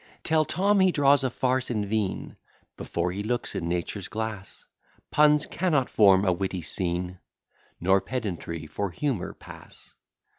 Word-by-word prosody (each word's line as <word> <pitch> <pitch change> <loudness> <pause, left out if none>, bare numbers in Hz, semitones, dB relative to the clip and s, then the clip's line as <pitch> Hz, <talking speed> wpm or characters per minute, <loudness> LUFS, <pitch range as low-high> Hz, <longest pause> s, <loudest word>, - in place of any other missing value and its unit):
Tell 155 -1 +2
Tom, 200 +7 +2
he 190 -1 +5
draws 145 -3 +4
a 130 - +1
farce 130 +1 0
in 105 -4 -1
vain, 105 -2 -2 0.4
Before 85 +1 -2
he 100 +3 -4
looks 120 +3 -2
in 85 - -3
nature's 90 +3 -3
glass; 110 -3 -6 0.5
Puns 150 0 +4
cannot 155 -8 0
form 100 -2 +5
a 90 - +3
witty 95 -1 -3
scene, 90 +1 -2 0.6
Nor 95 +2 +3
pedantry 90 -9 -4
for 100 +6 -3
humour 120 - -3
pass. - - -13
105 Hz, 145 wpm, -26 LUFS, 90-140 Hz, 0.6 s, he